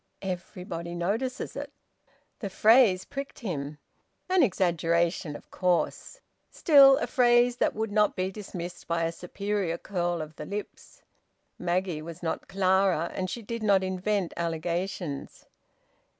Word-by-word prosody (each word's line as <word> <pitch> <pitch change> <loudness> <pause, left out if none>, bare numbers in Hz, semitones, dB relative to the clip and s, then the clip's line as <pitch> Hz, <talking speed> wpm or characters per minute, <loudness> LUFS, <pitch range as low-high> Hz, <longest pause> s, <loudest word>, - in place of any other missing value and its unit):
"Everybody 180 -2 -5
notices 220 +9 -2
it!" - - -6 0.7
The 200 - -4
phrase 215 -1 +5
pricked 275 0 -6
him. 150 - -4 0.5
An 375 -1 +5
exaggeration, 170 - +1
of - - -12
course! 180 - -1 0.3
Still, 275 -4 +7
a - - -1
phrase 240 -1 +4
that - - +1
would 220 0 -2
not 210 0 +3
be 185 +1 -1
dismissed 180 -4 -7
by 170 0 0
a 165 - 0
superior 190 0 -3
curl 175 -3 -2
of 155 0 -7
the 150 - -6
lips. 205 +1 -8 0.6
Maggie 180 -2 -1
was 165 +2 -9
not 165 - -3
Clara, 190 -3 +2
and 185 -1 -3
she 230 +5 -5
did 230 +2 -5
not 200 -3 +3
invent 190 0 -1
allegations. 170 -1 -3
185 Hz, 135 wpm, -28 LUFS, 170-210 Hz, 0.7 s, Still